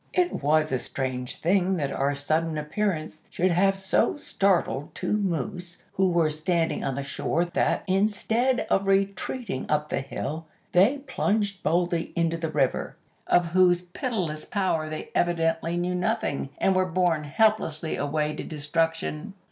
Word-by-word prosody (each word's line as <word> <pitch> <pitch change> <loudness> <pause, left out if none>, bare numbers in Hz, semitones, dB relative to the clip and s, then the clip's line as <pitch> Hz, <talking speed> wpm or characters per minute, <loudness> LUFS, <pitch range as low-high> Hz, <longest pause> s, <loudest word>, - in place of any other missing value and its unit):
"It 360 -1 +1
was 155 +2 +2
a 130 - +1
strange 125 -1 -3
thing 185 +2 +1
that 140 -4 -1
our 140 +1 0
sudden 155 +3 0
appearance 155 0 -2
should 185 +1 +1
have 195 +3 +3
so 190 +8 +1
startled 185 - 0
two - - -2
moose 180 -2 -2 0.2
who 190 0 +2
were 170 -3 +2
standing 165 +2 0
on 135 - -1
the 140 - -3
shore 165 +4 -1
that, 175 - 0
instead 220 +6 +1
of 195 0 +2
retreating 195 - -1
up 150 0 +1
the - - -1
hill, 155 +4 -5 0.2
they 200 +11 +4
plunged 205 -6 0
boldly 170 +1 0
into 165 -1 +1
the 165 -1 -3
river, 140 -4 0 0.3
of 175 0 +4
whose 180 0 +4
pitiless 180 - -3
power 175 -6 -1
they 155 - -6
evidently 165 0 +1
knew 175 +1 0
nothing, 175 -6 -1
and 190 - +2
were 185 0 +2
borne 175 -3 +1
helplessly 165 -3 +1
away 150 +1 -1
to - - -5
destruction. 165 +4 -2
170 Hz, 150 wpm, -26 LUFS, 155-190 Hz, 0.3 s, they